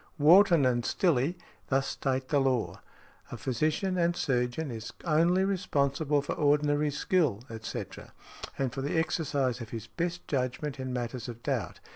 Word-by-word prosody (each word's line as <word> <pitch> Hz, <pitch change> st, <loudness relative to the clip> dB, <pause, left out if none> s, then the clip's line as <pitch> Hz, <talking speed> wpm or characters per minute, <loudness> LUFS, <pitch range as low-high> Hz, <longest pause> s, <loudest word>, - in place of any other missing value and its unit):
Wharton 170 Hz, 0 st, +6 dB
and 120 Hz, -1 st, +2 dB
Stillé 165 Hz, -, +1 dB, 0.3 s
thus 135 Hz, 0 st, +1 dB
state 130 Hz, -1 st, -2 dB
the 145 Hz, -, +3 dB
law: 130 Hz, -4 st, 0 dB, 0.5 s
"A -, -, -5 dB
physician 155 Hz, -, 0 dB
and 170 Hz, 0 st, +2 dB
surgeon 125 Hz, +2 st, -1 dB
is 115 Hz, 0 st, -6 dB
only 170 Hz, +3 st, +3 dB
responsible 150 Hz, -6 st, 0 dB
for -, -, -3 dB
ordinary 145 Hz, 0 st, +2 dB
skill, 145 Hz, -, 0 dB
etc., 110 Hz, 0 st, -7 dB, 0.5 s
and 130 Hz, -3 st, -1 dB
for 135 Hz, -, -4 dB
the 145 Hz, +4 st, -1 dB
exercise 140 Hz, -6 st, 0 dB
of 115 Hz, -, -7 dB
his 115 Hz, -2 st, -6 dB
best 175 Hz, +6 st, -4 dB
judgment 135 Hz, +1 st, -2 dB
in 130 Hz, -1 st, -4 dB
matters 120 Hz, -1 st, -4 dB
of 120 Hz, 0 st, -9 dB
doubt. -, -, -2 dB
140 Hz, 150 wpm, -29 LUFS, 125-160 Hz, 0.5 s, Wharton